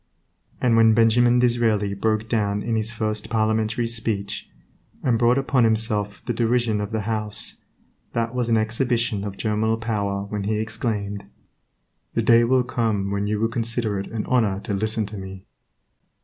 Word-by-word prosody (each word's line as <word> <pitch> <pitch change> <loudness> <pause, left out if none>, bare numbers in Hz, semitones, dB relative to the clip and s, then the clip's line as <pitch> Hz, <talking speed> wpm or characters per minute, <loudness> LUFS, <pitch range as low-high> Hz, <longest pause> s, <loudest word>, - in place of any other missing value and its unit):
And 120 -2 +3
when 110 -1 +5
Benjamin 120 +2 +4
Disraeli 115 -5 +2
broke 110 +2 0
down 105 -3 0
in 115 -1 -1
his 110 0 -1
first 110 -1 -3
Parliamentary 110 +1 0
speech, 110 -4 -3 0.5
and 120 -3 +2
brought 120 +2 +4
upon 135 -2 +2
himself 110 -2 0
the 120 - -1
derision 115 -2 +1
of 105 - -4
the 110 -1 -1
House, 105 -1 -2 0.5
that 115 0 -1
was 125 -2 -1
an 115 - +4
exhibition 115 -1 0
of 100 -1 -5
germinal 110 +1 0
power 100 -4 -2
when 100 0 -4
he 110 +1 0
exclaimed, 110 -2 -3 0.9
"The - - +1
day 115 0 +6
will 130 +2 +3
come 110 -5 -1
when 100 0 -1
you 105 0 -1
will 115 - +2
consider 115 -3 -1
it 100 - -5
an 110 -2 -4
honor 110 -7 +1
to 105 - -4
listen 110 +2 0
to 105 +1 -8
me." 95 0 -9
110 Hz, 165 wpm, -23 LUFS, 105-115 Hz, 0.9 s, day